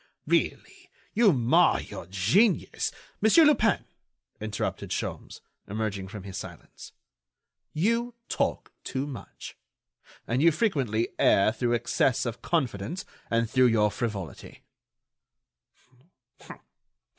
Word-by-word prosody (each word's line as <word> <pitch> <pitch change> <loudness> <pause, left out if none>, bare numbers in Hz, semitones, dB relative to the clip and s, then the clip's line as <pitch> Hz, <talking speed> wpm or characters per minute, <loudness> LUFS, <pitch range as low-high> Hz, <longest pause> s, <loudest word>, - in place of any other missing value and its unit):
really, - - -1 0.2
you 220 -2 +5
mar 125 -5 +3
your - - -8
genius——" 115 - +2 0.3
"Monsieur 220 +10 +6
Lupin," 230 -9 +3 0.5
interrupted 110 -1 -4
Sholmes, - - -5 0.3
emerging 100 -2 -3
from 100 0 -8
his 95 -1 -7
silence, 85 -4 -11 0.8
"you 230 +8 0
talk - - -2
too 135 +1 -3
much, 140 -4 -9 0.7
and 125 +4 0
you 170 +2 +6
frequently 135 - 0
err 100 +2 +4
through 120 +1 0
excess 120 +2 +1
of 120 0 -4
confidence 145 - -2 0.2
and 115 0 +1
through 130 +2 +4
your 105 -3 +3
frivolity." 100 -8 -6
120 Hz, 100 wpm, -27 LUFS, 105-170 Hz, 0.8 s, Monsieur